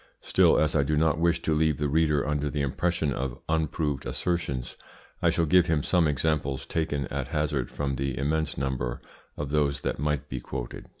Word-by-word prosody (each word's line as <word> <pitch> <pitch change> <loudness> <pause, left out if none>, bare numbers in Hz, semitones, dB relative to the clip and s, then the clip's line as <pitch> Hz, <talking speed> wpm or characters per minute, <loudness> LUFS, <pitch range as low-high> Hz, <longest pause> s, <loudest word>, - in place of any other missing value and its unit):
Still, - - +4
as 75 0 +2
I 75 - +5
do 75 +2 0
not 80 -1 +2
wish 85 0 +2
to 80 - +1
leave 75 -2 +2
the 75 - 0
reader 75 -1 +2
under 75 0 0
the 70 0 -1
impression 80 +1 0
of 65 0 -3
unproved 80 -3 0
assertions, 70 -8 -2 0.5
I - - +4
shall 85 - +2
give 90 +3 +4
him 75 -3 +1
some 85 -3 +3
examples 70 -2 0
taken 75 -4 -1
at 70 -2 -3
hazard 75 -5 -1
from 70 -2 -2
the 70 -1 -2
immense 75 +1 -1
number 65 -3 -2 0.4
of 70 -1 -4
those 75 -2 +1
that - - -2
might 75 -1 -1
be 65 - -4
quoted. - - -6
75 Hz, 190 wpm, -27 LUFS, 70-80 Hz, 0.5 s, I